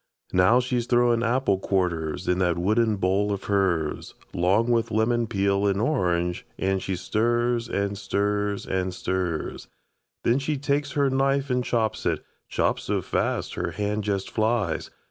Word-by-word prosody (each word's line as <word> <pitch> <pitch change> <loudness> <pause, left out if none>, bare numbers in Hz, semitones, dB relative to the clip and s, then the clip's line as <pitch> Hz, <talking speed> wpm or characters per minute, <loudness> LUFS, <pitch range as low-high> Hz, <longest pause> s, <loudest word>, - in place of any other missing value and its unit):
Now 95 +7 +5
she's 125 -1 -1
throwin' 120 -1 +3
apple 120 -4 +1
quarters 90 -3 -1
In 90 0 +2
that 90 -2 +1
wooden 110 +5 +2
bowl 95 +2 +1
of 100 - -3
hers, 95 -6 0 0.2
'Long 100 +7 +2
with 115 -1 +2
lemon 115 +2 +1
peel 100 0 +1
and 100 0 +1
orange, 90 - 0
An' 95 0 0
she 95 0 -3
stirs, 120 +5 0
an' 100 0 -1
stirs, 100 0 -1
an' 95 -1 -1
stirs. 90 -3 -3 0.6
Then 120 +3 +3
she 145 +2 -1
takes 140 +1 -1
her 140 -2 +2
knife 135 0 +1
an' 125 0 +2
chops 115 -3 -1
it, - - -1 0.2
Chops - - 0
so - - -1
fast - - -1
her 85 -1 -3
hand 105 +3 -2
jest 100 -2 -2
flies. 110 -6 0
105 Hz, 155 wpm, -25 LUFS, 95-120 Hz, 0.6 s, Now